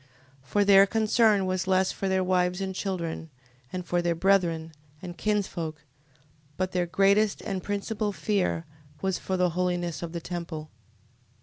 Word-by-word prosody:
15:18. -, -, -26 dB
For 205 Hz, -1 st, +2 dB
their 195 Hz, 0 st, +8 dB
concern 215 Hz, -2 st, +3 dB
was 185 Hz, 0 st, -1 dB
less 190 Hz, 0 st, +3 dB
for 195 Hz, -, -3 dB
their 190 Hz, 0 st, +2 dB
wives, 180 Hz, 0 st, +1 dB
and 190 Hz, -1 st, -3 dB
children, 170 Hz, -4 st, -3 dB, 0.4 s
and 180 Hz, -1 st, -4 dB
for 175 Hz, 0 st, +1 dB
their 170 Hz, -1 st, 0 dB
brethren, 165 Hz, -3 st, +2 dB, 0.3 s
and 175 Hz, 0 st, -8 dB
kinsfolks: 175 Hz, -7 st, -2 dB, 0.7 s
but 185 Hz, 0 st, -1 dB
their 180 Hz, -1 st, 0 dB
greatest 200 Hz, +3 st, +3 dB
and 195 Hz, -2 st, -3 dB
principal 205 Hz, +2 st, -2 dB
fear 180 Hz, -1 st, -1 dB, 0.4 s
was 190 Hz, -1 st, 0 dB
for 190 Hz, -, -2 dB
the 180 Hz, -1 st, +2 dB
holiness 175 Hz, -1 st, -1 dB
of 170 Hz, -1 st, -5 dB
the 170 Hz, -, -4 dB
temple. 165 Hz, -3 st, -6 dB
185 Hz, 160 wpm, -27 LUFS, 175-195 Hz, 0.7 s, their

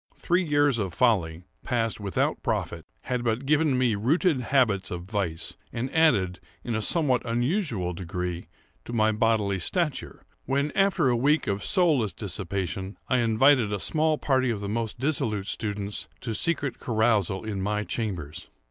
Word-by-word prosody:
Three 180 Hz, +2 st, +1 dB
years 145 Hz, -5 st, +2 dB
of 95 Hz, -5 st, -3 dB
folly, 90 Hz, -9 st, +1 dB, 0.2 s
passed 115 Hz, -4 st, -1 dB
without 100 Hz, -2 st, -1 dB
profit, -, -, -3 dB
had 125 Hz, -1 st, -2 dB
but 115 Hz, +3 st, -1 dB
given 150 Hz, -1 st, +2 dB
me 125 Hz, -3 st, +2 dB
rooted 140 Hz, -, +1 dB
habits 115 Hz, -7 st, +1 dB
of 85 Hz, -1 st, -5 dB
vice, 95 Hz, -5 st, -3 dB, 0.2 s
and 125 Hz, +3 st, -4 dB
added, 100 Hz, -, +3 dB, 0.2 s
in 120 Hz, -, -3 dB
a 110 Hz, -, -1 dB
somewhat 135 Hz, -1 st, +2 dB
unusual 120 Hz, -, -1 dB
degree, 90 Hz, 0 st, -4 dB, 0.4 s
to 120 Hz, -, -7 dB
my 110 Hz, -1 st, +3 dB
bodily 105 Hz, -3 st, +1 dB
stature, 155 Hz, -, -2 dB, 0.2 s
when, 140 Hz, +2 st, 0 dB
after 195 Hz, -7 st, +2 dB
a 120 Hz, -, +2 dB
week 145 Hz, +6 st, +2 dB
of 100 Hz, +1 st, -2 dB
soulless 155 Hz, -, +2 dB
dissipation, 95 Hz, -1 st, -3 dB
I 130 Hz, -, +3 dB
invited 120 Hz, 0 st, +4 dB
a 100 Hz, -, -1 dB
small 155 Hz, -, +1 dB
party 130 Hz, -3 st, +1 dB
of 110 Hz, -3 st, -1 dB
the 100 Hz, -, -5 dB
most 110 Hz, +2 st, -3 dB
dissolute 115 Hz, -7 st, 0 dB
students 100 Hz, -1 st, -4 dB
to 115 Hz, -, -4 dB
a -, -, -2 dB
secret 140 Hz, +3 st, -1 dB
carousal 110 Hz, -5 st, +1 dB
in 100 Hz, -3 st, -3 dB
my 105 Hz, +2 st, -1 dB
chambers. 90 Hz, -11 st, -4 dB
115 Hz, 160 wpm, -26 LUFS, 100-135 Hz, 0.4 s, invited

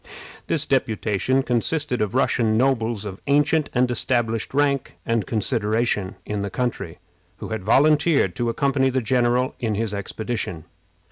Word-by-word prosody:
This -, -, 0 dB
deputation 110 Hz, +4 st, 0 dB
consisted 125 Hz, +2 st, -1 dB
of 105 Hz, +1 st, -1 dB
Russian 115 Hz, -4 st, +2 dB
nobles 115 Hz, -4 st, +1 dB
of 95 Hz, -2 st, -7 dB
ancient 145 Hz, +2 st, +2 dB
and 125 Hz, 0 st, +1 dB
established 115 Hz, -2 st, -1 dB
rank 140 Hz, -1 st, 0 dB
and 115 Hz, -4 st, 0 dB
consideration 110 Hz, -3 st, 0 dB
in 105 Hz, -1 st, -3 dB
the 100 Hz, 0 st, -2 dB
country, 100 Hz, -7 st, -3 dB, 0.4 s
who -, -, -7 dB
had 110 Hz, -3 st, -4 dB
volunteered 145 Hz, -, +3 dB
to 120 Hz, -1 st, 0 dB
accompany 135 Hz, +1 st, +1 dB
the 130 Hz, 0 st, 0 dB
general 125 Hz, +2 st, +1 dB
in 110 Hz, -3 st, -1 dB
his 110 Hz, 0 st, -2 dB
expedition. 100 Hz, -4 st, -4 dB
120 Hz, 140 wpm, -23 LUFS, 105-130 Hz, 0.4 s, volunteered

